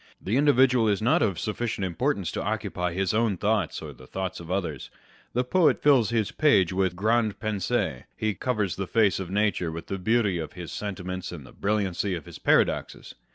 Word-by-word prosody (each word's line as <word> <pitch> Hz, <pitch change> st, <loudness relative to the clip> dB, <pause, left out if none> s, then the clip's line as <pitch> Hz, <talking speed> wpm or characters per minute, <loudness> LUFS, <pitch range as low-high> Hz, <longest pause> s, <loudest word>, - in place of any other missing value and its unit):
The 100 Hz, -, -2 dB
individual 130 Hz, -4 st, +4 dB
is 100 Hz, -2 st, +2 dB
not 115 Hz, +3 st, +3 dB
of 95 Hz, -4 st, +1 dB
sufficient 105 Hz, 0 st, -2 dB
importance 95 Hz, -, -1 dB
to -, -, -3 dB
occupy 100 Hz, -4 st, -2 dB
his 95 Hz, +2 st, 0 dB
own 110 Hz, -3 st, +1 dB
thoughts 105 Hz, -3 st, 0 dB
or -, -, -7 dB
the 65 Hz, -, -15 dB
thoughts 95 Hz, -2 st, -4 dB
of 85 Hz, -1 st, -10 dB
others. 85 Hz, -8 st, -3 dB, 0.4 s
The 125 Hz, -, +1 dB
poet 165 Hz, +6 st, +3 dB
fills 135 Hz, -7 st, +5 dB
his 115 Hz, -3 st, 0 dB
page 100 Hz, -, +3 dB
with 95 Hz, -1 st, 0 dB
grandes 110 Hz, +2 st, +1 dB
pensees. 105 Hz, -, -1 dB
He 110 Hz, -1 st, 0 dB
covers 105 Hz, -3 st, -1 dB
the 95 Hz, -1 st, -3 dB
face 105 Hz, -3 st, +2 dB
of 95 Hz, -3 st, -5 dB
nature 100 Hz, -4 st, 0 dB
with 85 Hz, +1 st, -7 dB
the 95 Hz, -, -4 dB
beauty 105 Hz, -2 st, +1 dB
of 80 Hz, -, -5 dB
his 90 Hz, -2 st, -8 dB
sentiments 90 Hz, -3 st, -5 dB
and 80 Hz, -6 st, -8 dB
the -, -, -14 dB
brilliancy 100 Hz, -2 st, -1 dB
of 80 Hz, -, -7 dB
his -, -, -11 dB
paradoxes. -, -, +1 dB
100 Hz, 195 wpm, -26 LUFS, 90-115 Hz, 0.4 s, fills